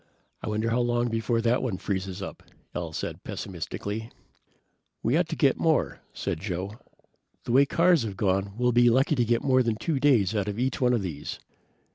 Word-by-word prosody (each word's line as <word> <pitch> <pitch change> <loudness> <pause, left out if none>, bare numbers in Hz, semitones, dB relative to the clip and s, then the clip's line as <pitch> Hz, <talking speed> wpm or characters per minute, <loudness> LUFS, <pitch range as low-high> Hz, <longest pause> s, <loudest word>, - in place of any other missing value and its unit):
"I - - -6
wonder 110 +2 0
how 120 - +2
long 120 0 +1
before 115 +1 0
that 120 +2 +2
one 115 -8 -2
freezes 95 0 -3
up," - - -7 0.3
Al 85 -2 -4
said - - -5
pessimistically. 100 +5 -5 0.9
"We - - +2
ought - - +2
to - - -2
get - - +3
more," - - +1
said - - -3
Joe. 95 +3 -4 0.6
"The - - -4
way 130 +3 +6
the 140 - 0
cars 170 -2 +5
have 105 -4 -4
gone 95 0 0
we'll 125 0 +2
be 120 0 +5
lucky 130 +5 +3
to 125 -5 +2
get 115 +1 +1
more 130 -1 +4
than 115 -3 0
2 145 +5 -1
days 120 -9 +3
out 100 -2 0
of 105 0 -3
each 130 +3 -1
one 125 -1 +4
of 115 -5 +1
these." 75 -6 -5
115 Hz, 200 wpm, -27 LUFS, 100-125 Hz, 0.9 s, way